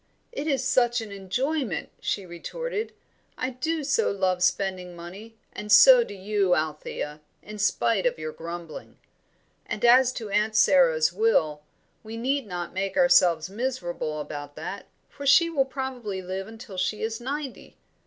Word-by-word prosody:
"It 320 Hz, -10 st, -4 dB
is 275 Hz, -3 st, +1 dB
such 250 Hz, -2 st, +2 dB
an 215 Hz, -2 st, -8 dB
enjoyment," 235 Hz, -, -2 dB
she 200 Hz, -, -2 dB
retorted. 435 Hz, -, -5 dB, 0.5 s
"I 255 Hz, -, -2 dB
do 310 Hz, +5 st, -2 dB
so 450 Hz, +11 st, +1 dB
love 185 Hz, -2 st, 0 dB
spending 185 Hz, -1 st, 0 dB
money, 190 Hz, +7 st, -10 dB, 0.2 s
and 210 Hz, 0 st, -6 dB
so -, -, +9 dB
do 205 Hz, -, -9 dB
you, 195 Hz, -1 st, +1 dB
Althea, 150 Hz, -1 st, -4 dB, 0.2 s
in 210 Hz, 0 st, -9 dB
spite 205 Hz, +1 st, +2 dB
of 245 Hz, -, -1 dB
your 155 Hz, 0 st, -5 dB
grumbling. 165 Hz, 0 st, -8 dB, 0.7 s
And 225 Hz, +1 st, -2 dB
as 250 Hz, +1 st, +6 dB
to 220 Hz, -5 st, -6 dB
Aunt 210 Hz, +2 st, +1 dB
Sara's 170 Hz, -6 st, +4 dB
will, 170 Hz, -8 st, +2 dB, 0.4 s
we 225 Hz, +1 st, -8 dB
need 265 Hz, +1 st, -1 dB
not 175 Hz, -2 st, -5 dB
make 195 Hz, +7 st, -3 dB
ourselves 180 Hz, -, +4 dB
miserable 190 Hz, -8 st, -3 dB
about 145 Hz, -1 st, -7 dB
that, -, -, -7 dB, 0.2 s
for 285 Hz, 0 st, -7 dB
she 335 Hz, +4 st, +6 dB
will 275 Hz, -4 st, +2 dB
probably 255 Hz, -7 st, -5 dB
live 190 Hz, +2 st, -5 dB
until 220 Hz, -3 st, -10 dB
she 210 Hz, +4 st, -1 dB
is 225 Hz, +1 st, -3 dB
ninety." 275 Hz, +1 st, -6 dB
210 Hz, 155 wpm, -26 LUFS, 180-260 Hz, 0.7 s, so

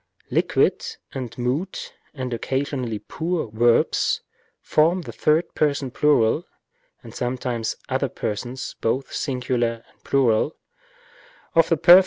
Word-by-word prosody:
Liquid -, -, +2 dB, 0.3 s
and 125 Hz, -4 st, -5 dB
mute 130 Hz, +10 st, -2 dB, 0.2 s
(and 130 Hz, -3 st, -3 dB
occasionally 130 Hz, -2 st, -2 dB
pure) 160 Hz, -, -3 dB
verbs 120 Hz, +1 st, +3 dB, 0.4 s
form 170 Hz, +4 st, +2 dB
the -, -, -7 dB
third 155 Hz, +3 st, +1 dB
person 140 Hz, -3 st, +1 dB
plural 150 Hz, +1 st, +3 dB, 0.6 s
(and -, -, -11 dB
sometimes 125 Hz, -2 st, -2 dB
other -, -, 0 dB
persons 120 Hz, +5 st, -4 dB
both 130 Hz, +4 st, -1 dB
singular 125 Hz, -4 st, -1 dB
and -, -, -34 dB
plural) 130 Hz, +1 st, +2 dB, 1.0 s
of 165 Hz, 0 st, +5 dB
the 165 Hz, -, +3 dB
perf. 175 Hz, +5 st, +9 dB
130 Hz, 115 wpm, -23 LUFS, 120-150 Hz, 1.0 s, perf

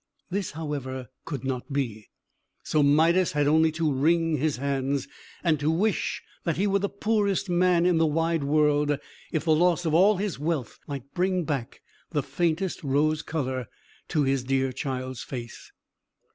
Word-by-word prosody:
This, 195 Hz, -3 st, -2 dB
however, 140 Hz, -5 st, -5 dB, 0.2 s
could 140 Hz, -5 st, -5 dB
not 130 Hz, +1 st, -3 dB
be. 115 Hz, -7 st, -3 dB, 0.5 s
So 155 Hz, -, +1 dB
Midas 160 Hz, +5 st, +4 dB
had 145 Hz, -1 st, +2 dB
only 160 Hz, +2 st, +4 dB
to 160 Hz, -2 st, 0 dB
wring 165 Hz, +3 st, +2 dB
his 150 Hz, 0 st, 0 dB
hands, 140 Hz, 0 st, -1 dB, 0.4 s
and 160 Hz, -4 st, +2 dB
to 150 Hz, +2 st, +1 dB
wish 195 Hz, +6 st, 0 dB, 0.2 s
that 170 Hz, -, -1 dB
he 195 Hz, -, +2 dB
were 200 Hz, -1 st, +2 dB
the 200 Hz, 0 st, -1 dB
poorest 200 Hz, -2 st, 0 dB
man 175 Hz, -1 st, +3 dB
in 180 Hz, -2 st, +3 dB
the 160 Hz, -, +4 dB
wide 165 Hz, 0 st, +1 dB
world, 150 Hz, 0 st, +2 dB, 0.3 s
if 155 Hz, -, -1 dB
the 160 Hz, -, +4 dB
loss 175 Hz, +2 st, +3 dB
of 160 Hz, -, 0 dB
all 195 Hz, +5 st, +5 dB
his 195 Hz, -4 st, -3 dB
wealth 150 Hz, -6 st, -2 dB
might 140 Hz, -1 st, -7 dB
bring 185 Hz, 0 st, +1 dB
back 140 Hz, -5 st, -4 dB, 0.3 s
the 145 Hz, -4 st, -1 dB
faintest 165 Hz, +6 st, -1 dB
rose 150 Hz, +3 st, +1 dB
colour 130 Hz, -7 st, -3 dB, 0.4 s
to 150 Hz, -, +1 dB
his 135 Hz, -1 st, +1 dB
dear 135 Hz, 0 st, +1 dB
child's 130 Hz, -2 st, -4 dB
face. 120 Hz, -3 st, -8 dB
155 Hz, 165 wpm, -26 LUFS, 135-170 Hz, 0.5 s, all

